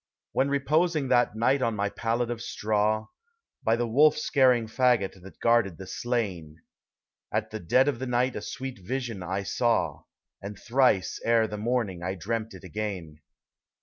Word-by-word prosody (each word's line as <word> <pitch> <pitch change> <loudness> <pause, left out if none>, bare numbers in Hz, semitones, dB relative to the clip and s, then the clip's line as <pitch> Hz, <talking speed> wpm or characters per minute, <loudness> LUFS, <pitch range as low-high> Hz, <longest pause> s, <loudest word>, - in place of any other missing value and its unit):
When 135 +1 +1
reposing 150 +1 +1
that 120 -3 +3
night 130 +5 +2
on 115 -3 0
my 100 0 0
pallet 115 +3 -1
of 115 -1 -4
straw. 110 -1 0 0.6
By 110 - +2
the 120 +1 -1
wolf 150 +6 +5
scaring 125 -4 +3
fagot 110 -5 +1
that 95 +1 -14
guarded 115 -7 +2
the 95 - -8
slain; 95 -10 -3 0.7
At - - -2
the 110 - -5
dead 125 - +3
of 140 -5 0
the 130 - -3
night 125 +1 +1
a - - -4
sweet 130 -3 -6
vision 120 -2 -3
I 95 +2 -3
saw, 120 +4 0 0.4
And 100 0 -7
thrice 120 -5 +2
ere 115 -1 +3
the 105 - -6
morning 110 -6 -1
I 90 +2 -3
dreamt 110 +3 -3
it 90 - -12
again. 95 -8 -5
115 Hz, 165 wpm, -27 LUFS, 100-125 Hz, 0.7 s, wolf